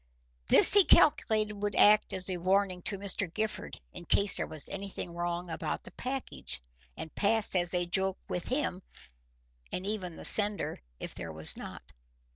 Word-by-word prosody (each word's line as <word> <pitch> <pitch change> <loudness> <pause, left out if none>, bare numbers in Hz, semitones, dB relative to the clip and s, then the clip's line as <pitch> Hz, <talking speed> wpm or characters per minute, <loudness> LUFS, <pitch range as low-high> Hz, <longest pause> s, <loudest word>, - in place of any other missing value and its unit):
This - - +6
he 405 -1 +8
calculated 215 - +2
would 205 0 -2
act 210 0 +5
as 185 -1 -1
a 185 -2 -1
warning 185 +1 0
to 200 - 0
Mr. 195 -2 -2
Gifford 205 - -4
in 175 - -8
case 200 +2 +3
there - - -1
was 155 -3 -5
anything 195 -3 -7
wrong 175 +1 -4
about - - -4
the - - -13
package, 255 - -4 0.4
and 160 - -8
pass 215 +1 +2
as 175 -1 +1
a 175 0 +1
joke 190 +2 -1
with 175 - -4
him, 255 -9 -2 0.9
and 180 - -4
even 195 -5 -4
the - - -8
sender, 205 -1 +4 0.2
if - - -7
there 85 - -7
was 80 0 0
not. - - -10
190 Hz, 170 wpm, -29 LUFS, 175-210 Hz, 0.9 s, he